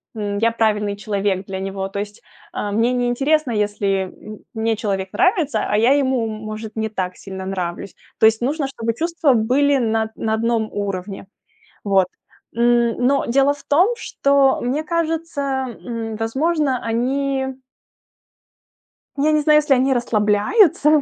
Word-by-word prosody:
м, 205 -1 -3
я 230 +2 +3
правильный 210 -3 0
человек 200 -2 -1
для 190 0 -5
него. 195 0 -4
То 200 - -5
есть, 205 0 -7 0.3
а, 205 - -3
мне 230 +4 +2
не 245 -1 0
интересно, 275 +3 +1
если, 205 -2 0
м, 215 0 -10 0.2
мне 225 0 0
человек 195 -3 -3
нравится, 365 -6 +2
а 210 - +2
я 230 +4 +4
ему, 260 -4 +1
может, 215 0 -7
не 220 0 -2
так 185 -4 -4
сильно 190 -1 -8
нравлюсь. 185 -1 -4 0.3
То - - +5
есть 220 +1 +4
нужно, 280 +4 -1
чтобы 230 -4 -3
чувства 330 -2 +1
были 265 +5 +2
на 225 -3 0
на 220 - -2
одном 225 0 0
уровне. 195 -1 -4 0.6
Вот. 195 -2 +3 0.5
М, 235 -1 +3
но 275 +1 +2
дело 275 +3 +3
в 290 - -16
том, 360 +11 +3
что, 280 - +2
мне 265 +5 -1
кажется, 330 -1 -2 0.4
м, 225 -2 -5
возможно, 265 +4 0
они 265 +3 -1 1.6
Я 300 +2 +2
не 305 - +3
знаю, 300 0 +5
если 295 -2 +2
они 265 +1 +3
расслабляются, 255 - +3
230 Hz, 150 wpm, -20 LUFS, 210-280 Hz, 1.6 s, То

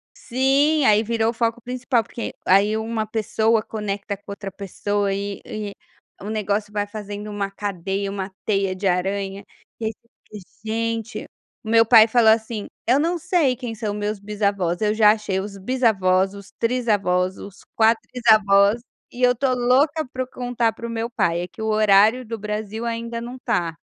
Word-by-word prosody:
Sim, 275 +4 +2
aí 215 0 +5
virou 225 0 0
o - - -11
foco 230 0 -1
principal 250 -1 -1
porque 235 - -6
aí 205 +3 +4
uma 220 0 -2
pessoa 220 +1 +1
conecta 205 -2 -4
com 200 0 -12
outra 200 -1 -6
pessoa 200 +1 -2
e 200 0 -4
e 210 -2 -6 0.6
negócio 210 -1 -1
vai 205 -1 -1
fazendo 210 0 -7
uma 200 -1 -2
cadeia, 195 0 -3
uma 195 -1 -5
teia 195 -3 0
de 195 +1 -2
aranha, 195 +2 -1 0.4
e 225 - -3
ai 220 - 0
você 230 +2 -25 0.4
fica - - -36 0.2
"Gente", 230 +1 -3 0.4
o - - -5
meu 225 0 +6
pai 225 -1 +8
falou 225 -1 +4
assim: 220 -1 -1 0.2
"Eu 260 +4 +4
não 340 +3 +1
sei 320 -7 +1
quem 245 -3 -6
são 215 -2 -3
meus 210 0 -3
bisavós, 200 -4 -1
eu 210 0 +2
já 215 -1 +6
achei 210 -3 -2
os 200 +1 -6
bisavós, 195 -4 +1
os 200 -1 -12
trisavós, 205 -7 +1
os 200 -1 -11
quatrisavós.". 220 -2 +4 0.3
E 250 - -9
eu 245 - +6
estou 255 +1 0
louca 280 +6 +2
para 260 0 -2
o - - -11
contar 245 -3 -1
para 235 +1 -7
o - - -7
meu 230 +1 -3
pai, 170 -7 0
é 175 - -4
que 220 - -12
o 220 - -2
horário 215 +3 +4
do 230 0 -5
Brasil 210 +2 -4
ainda 230 0 -3
não 240 +2 -7
está. 190 -10 -1
215 Hz, 180 wpm, -22 LUFS, 200-235 Hz, 0.6 s, pai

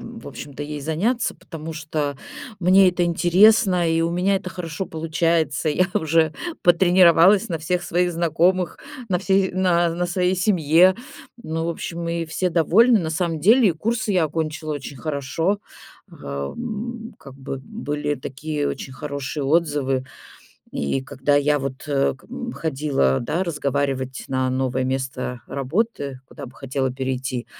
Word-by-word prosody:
м, - - -9
в - - -9
общем-то, 145 0 -8
ей 150 0 -5
заняться, 185 - 0
потому 165 -1 -8
что 155 -2 -3 0.4
мне 185 +1 +6
это 180 0 0
интересно, 180 +1 +4
и 165 0 +2
у 165 - 0
меня 185 +3 +1
это 185 -1 -5
хорошо 180 0 -5
получается. 160 -2 0
Я 180 +5 +2
уже 160 0 +2 0.3
потренировалась 180 +3 +5
на 165 -3 -2
всех 175 +3 -1
своих 175 0 0
знакомых, 175 +2 +1 0.3
на 180 -3 +1
всей 195 0 +2
на 180 -2 +2
на 175 +1 -1
своей 180 +1 0
семье. 180 -1 +4 0.5
Ну, 165 -5 -3
в - - 0
общем, 170 0 -5
и 170 0 -1
все 180 +3 -1
довольны. 205 +8 +4
На 160 -2 -3
самом 165 -1 -1
деле, 215 - +5
курсы 220 +4 -1
я 180 -3 +3
окончила 155 0 -3
очень 140 -1 -7
хорошо, 155 +7 -1 0.5
ам, 225 - -6
как 135 -2 -13
бы 135 0 -6
были 150 -9 -3
такие 145 +2 -4
очень 135 - -6
хорошие 140 +1 -5
отзывы. 145 -4 +1 0.7
И 70 - -1
когда 135 +2 -1
я, 145 +1 +3
вот, 135 -1 -5
э, 140 -1 +1
как 135 - -22
м 245 -1 -5
ходила, 135 - 0
да, 155 +9 -1
разговаривать 140 -5 -2
на 130 -1 0
новое 130 0 -1
место 130 -1 -3
работы, 140 - -2
куда 140 -2 -10
бы 125 - -12
хотела 135 -1 -2
перейти, 130 -1 -3
160 Hz, 150 wpm, -22 LUFS, 140-180 Hz, 0.7 s, мне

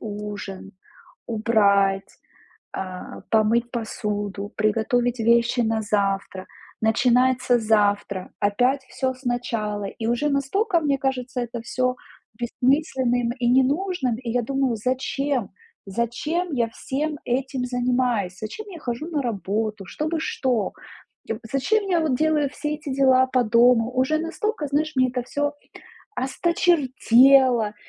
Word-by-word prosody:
ужин, 205 -2 -7 0.5
убрать, 200 -4 +2 0.6
а, 185 -1 -7
помыть 230 +2 +2
посуду, 205 -3 -4
приготовить 235 +3 +1
вещи 235 +2 +3
на 225 -1 0
завтра". 195 -2 -1 0.3
Начинается 245 +2 +3
завтра, 205 -3 +1
опять 245 +7 +2
всё 260 -1 -2
сначала, 235 -5 -3
и 220 +3 -5
уже 240 +6 +1
настолько, 340 - +1
мне 280 -3 +1
кажется, 255 -1 -2
это 240 -1 -4
всё 250 +2 -1 0.4
бессмысленным 245 -1 +1
и 240 - 0
ненужным, 265 - +1
и 240 -1 -5
я 245 +1 +1
думаю: 270 -1 0
"Зачем? 260 +1 -1 0.4
Зачем 240 - -2
я 235 -3 +1
всем 290 +6 -3
этим 260 +1 -1
занимаюсь? 245 -6 0
Зачем 325 - -6
я 360 -4 -9
хожу 245 +3 -4
на 300 -4 -1
работу, 215 -2 -2
чтобы 315 - -3
что? 245 -9 -1 0.5
Я 225 - -3
в - - -14
зачем 405 +10 +1
я 345 -2 +2
вот 300 -6 +1
делаю 305 -1 +2
все 300 +1 -3
эти 295 -2 -7
дела 260 -1 +4
по 255 -1 +2
дому?" 235 +1 +4
Уже 265 +5 +2
настолько, 335 +2 -2
знаешь, 310 +2 0
мне 255 0 +4
это 250 0 -2
всё 290 +3 -1 0.6
осточертело, 260 - +3
245 Hz, 125 wpm, -23 LUFS, 220-275 Hz, 0.6 s, дела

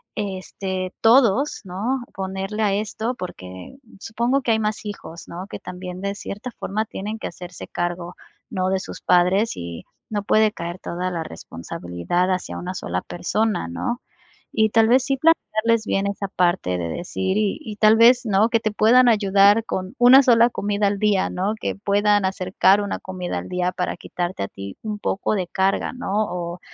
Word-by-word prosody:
este 190 -2 -4
todos, 245 +3 +4
¿no?, 215 +8 -2
ponerle 195 +2 -4
a 200 -2 +2
esto", 220 +4 -2
porque 95 - -9 0.2
supongo 235 +6 0
que 245 - 0
hay 220 - +3
más 215 0 -2
hijos, 170 -5 -8
¿no?, 180 +3 -7
que - - -7
también 180 0 -7
de 200 0 -2
cierta 205 +4 -6
forma 215 +2 -1
tienen 210 +2 -6
que - - -4
hacerse 180 0 -9
cargo, 175 0 -3 0.3
¿no?, 185 -5 -1
de 190 0 +1
sus - - -8
padres 180 +5 +3
y 85 -1 -7 0.2
no 205 -2 -1
puede 215 +1 +3
caer 170 -2 -6
toda 180 +1 -3
la 170 -2 -3
responsabilidad 85 - -3
hacia 185 -1 -3
una 185 +1 -5
sola 90 - -3
persona, 210 - -1
¿no?, 85 - -3 0.5
y 220 -1 +2
tal 225 +1 +4
vez 250 +2 +4
sí 275 0 0
plantearles 230 -7 +2
bien 195 +1 0
esa 200 0 -3
parte 175 - +1
de 85 -1 -3
decir 190 - -2
y 210 -2 +1
y 210 -2 -8
tal 215 +1 +6
vez, 245 +2 +6
¿no?, 215 +1 +3
que 230 -1 +2
te 215 -1 -1
puedan 240 +4 +5
ayudar 205 0 +4
con 185 +3 -4
una 255 +3 +9
sola 235 -1 +5
comida 205 -1 0
al 200 0 -1
día, 205 -3 +2
¿no?, 195 +4 -1
que - - -2
puedan 205 0 +2
acercar 190 +1 +2
una 205 - -3
comida 185 -1 -4
al - - -9
día 180 0 0
para 180 -1 -3
quitarte 175 - -4
a 100 - -2
ti 100 0 -9
un 210 -1 -4
poco 200 - -1
de 185 -3 -2
carga, 190 +2 0
¿no?, 250 -6 -5 0.2
o 175 0 -5
195 Hz, 180 wpm, -22 LUFS, 180-220 Hz, 0.5 s, una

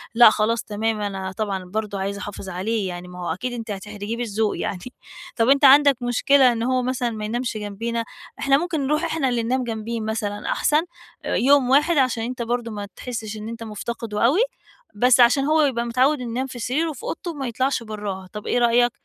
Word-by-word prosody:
لأ 235 -2 +9
خلاص، 220 +1 0
تمام، 215 0 -2
أنا 195 -2 -3
طبعًا 200 -2 -3
برضو 210 +1 -3
عايز 195 +1 -3
احافظ 200 -1 -7
عليه، 195 +3 -2
يعني 175 0 -6
ما 180 0 -10
هو 175 -2 -2
أكيد 245 +8 -4
أنتِ 230 -2 -5
هتحرجيه 210 +2 -5
بالذوق. 220 -2 -1
يعني 180 - -3 0.6
طب 225 +1 +2
أنت 280 +1 +5
عندك 280 0 +7
مشكلة 250 +2 +4
إن 230 -1 -2
هو 255 +1 +1
مثلًا 250 -1 -1
ما 215 -2 -5
ينامش 235 +1 -2
جنبينا؟ 230 +3 -3 0.4
إحنا 275 0 +4
ممكن 315 -4 -2
نرُوح 305 +3 +1
احنا 320 -5 0
اللي 235 -2 0
ننام 255 +2 0
جنبيه 230 0 -4
مثلًا 215 -1 -3
أحسن 300 +1 +2 0.4
آآ - - -1
يوم 270 0 +4
واحد 295 +5 +4
عشان 250 -4 +2
أنت 250 +1 -4
برضو 235 0 -2
ما 205 -1 -5
تحسش 220 -4 -5
إن 215 +1 -6
أنت 230 0 -7
مُفتقده 220 0 -3
أوي، 285 - +4 0.6
بس 250 +3 +4
عشان 245 +3 +5
هو 310 +1 +3
يبقى 240 -5 0
متعوّد 255 +4 +2
إنه 240 - -4
ينام 260 +3 -2
في 250 -2 -8
سريره 290 +8 0
وفي 290 -7 -8
أوضته 345 +1 -4
وما 275 -4 -5
يطْلعش 255 +1 -1
برّاها، 205 -4 -6
طب 210 0 -7
إيه 245 - +2
رأيك؟ 240 0 +4
235 Hz, 205 wpm, -23 LUFS, 210-255 Hz, 0.6 s, لأ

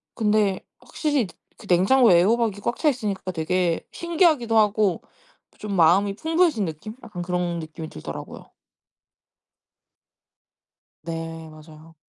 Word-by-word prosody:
근데 210 -3 +1 0.2
확실히 290 -8 -1 0.3
그 - - -14
냉장고에 190 +2 +5
애호박이 220 +2 +1
꽉 235 - -2
차 310 - +3
있으니까 205 -8 -3
되게 170 +1 -1
신기하기도 315 -9 +2
하고 210 -3 +2 0.6
좀 210 -1 -5
마음이 190 +4 +4
풍부해진 320 - +1
느낌? 165 +7 -7
약간 210 -6 -7
그런 175 -1 -2
느낌이 160 0 -8
들더라고요. 80 - -9 2.5
네. 165 -1 -6
맞아요. 155 +1 -15
195 Hz, 275 characters per minute, -23 LUFS, 170-230 Hz, 2.5 s, 냉장고에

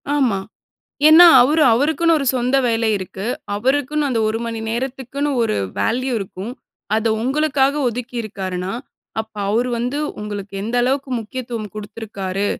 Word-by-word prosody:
ஆமா. 250 -9 +2 0.7
ஏன்னா 335 +3 +10 0.2
அவரு, 300 +5 +3
அவருக்குன்னு 320 +5 +2
ஒரு 275 - -3
சொந்த 250 +2 +1
வேலை 225 -1 +1
இருக்கு. 190 +2 -6 0.3
அவருக்குன்னு 285 +5 0
அந்த 230 -3 0
ஒரு 220 +1 -1
மணி 230 -1 -4
நேரத்துக்குன்னு 265 +3 -3
ஒரு 220 -2 0 0.2
வேல்யூ 255 +3 0
இருக்கும். 195 +3 -6 0.4
அத 225 +1 +1
உங்களுக்காக 280 0 +2
ஒதுக்கியிருக்காருன்னா, 210 -6 -4 0.5
அப்ப 220 0 -10 0.2
அவரு 235 +4 +1
வந்து 250 +5 -2 0.2
உங்களுக்கு 205 -1 -6
எந்த 230 +3 -2
அளவுக்கு 265 +2 0
முக்கியத்துவம் 230 -2 -6
குடுத்துருக்காரு. 205 -2 -4
240 Hz, 130 wpm, -20 LUFS, 215-270 Hz, 0.7 s, ஏன்னா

